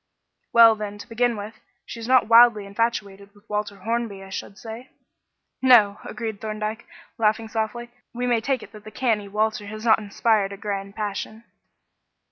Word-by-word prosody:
"Well, 230 -1 +8
then, 210 -1 -6
to 205 - -11
begin 235 0 0
with, 210 +2 -8 0.3
she 235 - -8
is 225 - -6
not 255 -2 +4
wildly 230 -2 +6
infatuated 200 -2 -3
with 205 +2 -23
Walter 210 -1 -3
Hornby, 225 -2 -3
I 190 - -12
should 195 +1 -7
say." 225 +5 -9 0.7
"No," 230 -6 +5
agreed 220 -4 -6
Thorndyke, 215 +1 -4 0.3
laughing 220 0 +1
softly; 225 +2 -4 0.2
"we 245 +1 -3
may 240 -2 +2
take 260 0 -1
it - - -13
that 215 -2 -13
the 215 - -9
canny 215 -4 -1
Walter 215 0 -1
has 215 +2 -7
not 220 -1 +5
inspired 205 -1 0
a - - -8
grand 200 -1 -5
passion." 215 +1 -5
215 Hz, 170 wpm, -24 LUFS, 205-230 Hz, 0.7 s, Well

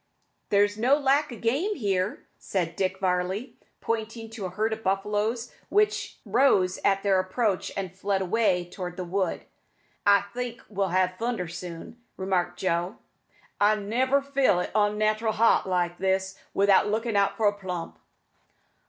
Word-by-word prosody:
"There's 205 +1 +2
no 260 +5 +4
lack 285 +1 +2
o' - - -6
game 290 - 0
here," 195 -6 -1
said 170 -4 -2
Dick 190 0 -1
Varley, 190 +6 -1 0.2
pointing 225 0 -3
to 215 -4 -5
a - - -6
herd 215 +5 -1
of 220 - -6
buffaloes 210 +4 -1 0.2
which 420 +1 +1
rose 190 -9 +3
at 195 0 +2
their 195 -2 +3
approach 190 +1 -1
and 185 -2 -4
fled 195 +1 0
away 185 -3 +1
towards 180 0 -7
the 185 - -3
wood. 185 +1 -2 0.6
"I 200 -1 +6
think 245 0 -5
we'll 195 -2 -1
ha' 185 +1 +1
thunder 230 -6 -2
soon," 175 +6 -8 0.2
remarked 180 -2 -1
Joe. 175 +1 -1 0.6
"I 210 +1 +5
never 255 +7 +1
feel 275 -9 +2
it 180 - -4
onnatteral 215 +1 +1
hot 220 -3 +3
like 175 -1 0
this 190 0 0 0.2
without 200 +1 +4
lookin' 225 +1 -1
out 200 -1 +2
for 220 - +1
a 205 - +3
plump." 180 - -6
200 Hz, 155 wpm, -26 LUFS, 185-225 Hz, 0.6 s, I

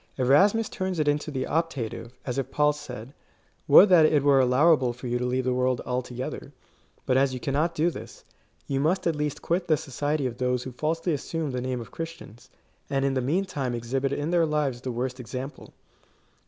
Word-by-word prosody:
Erasmus 195 - +4
turns 185 -1 -3
it 155 -2 0
into 145 +1 0
the 130 -3 -2
optative, 135 -8 -2 0.2
as 125 +1 -2
if 135 - -3
Paul 150 0 +2
said, 130 -4 -9 0.3
" - - -39
Would 200 - +8
that 165 -4 +7
it 150 -3 +2
were 140 -1 +5
allowable 130 0 +4
for 125 +2 -11
you 120 0 -1
to 125 - -1
leave 130 +1 0
the 125 0 0
world 125 0 +1
altogether;^ 125 +3 -4 0.5
but 130 - +2
as 135 -1 +2
you - - -5
cannot 150 +6 0
do 165 +3 +2
this, - - -10 0.4
you 135 -1 -1
must 175 +6 +1
at 165 -2 +1
least 150 -1 -3
quit 175 +1 0
the 155 - +3
society 145 +2 -2
of 120 -2 -4
those 125 -1 0
who 130 - -6
falsely 160 +6 -1
assume 155 +1 -3
the 125 -1 -3
name 130 0 -2
of 115 - -11
Christians, 165 -8 -8 0.4
and 135 -1 0
in 135 - +1
the 130 - 0
meantime 140 -3 -1
exhibit 130 +4 -2
in 145 +3 -2
their 170 -2 +3
lives 145 -5 -1
the 130 - -4
worst 125 +2 -3
example." 130 +3 -7
135 Hz, 205 wpm, -26 LUFS, 125-155 Hz, 0.5 s, Would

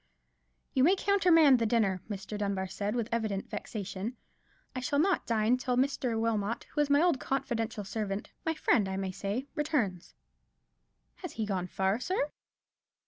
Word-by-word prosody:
"You 260 - +3
may 360 +7 +6
countermand 345 -9 +5
the 230 - +1
dinner," 205 -5 +2
Mr. 200 0 -5
Dunbar 200 -2 -1
said, 200 +3 -3
with 235 -3 -1
evident 220 -4 -2
vexation: 205 +2 -5 0.6
"I - - -1
shall 255 +3 -1
not 360 +5 +2
dine 230 +1 +3
till 250 -1 -1
Mr. 255 -3 +1
Wilmot, 225 -1 0
who 295 - +1
is 290 - +1
my 285 +3 +5
old 340 -7 +3
confidential 240 -6 -2
servant—my 210 +10 -4
friend, 210 -9 +2
I 190 - -3
may 190 -1 -2
say—returns." 215 - -2 1.0
"Has 360 - -7
he 220 - -2
gone 185 -3 -2
far, 190 +4 0
sir?" 300 0 -1
230 Hz, 150 wpm, -30 LUFS, 200-275 Hz, 1.0 s, may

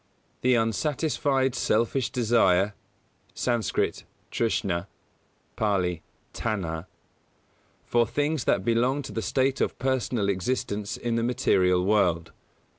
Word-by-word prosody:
The 125 0 +4
unsatisfied 135 - 0
selfish 120 +1 +1
desire 110 -5 +3 0.6
(Skt., 120 -3 -1 0.3
trshnā; 100 -6 -1 0.7
Pālī, 90 -6 0 0.3
tanhā) 90 -6 -3 1.0
for 120 -1 +2
things 145 +2 -1
that 95 - +1
belong 125 +5 +1
to - - -7
the 115 - -3
state 135 +3 0
of - - 0
personal 125 -5 0
existence 100 0 -2
in 120 -1 -1
the 115 - 0
material 90 -7 +2
world. 90 -5 +2
115 Hz, 105 wpm, -26 LUFS, 95-125 Hz, 1.0 s, The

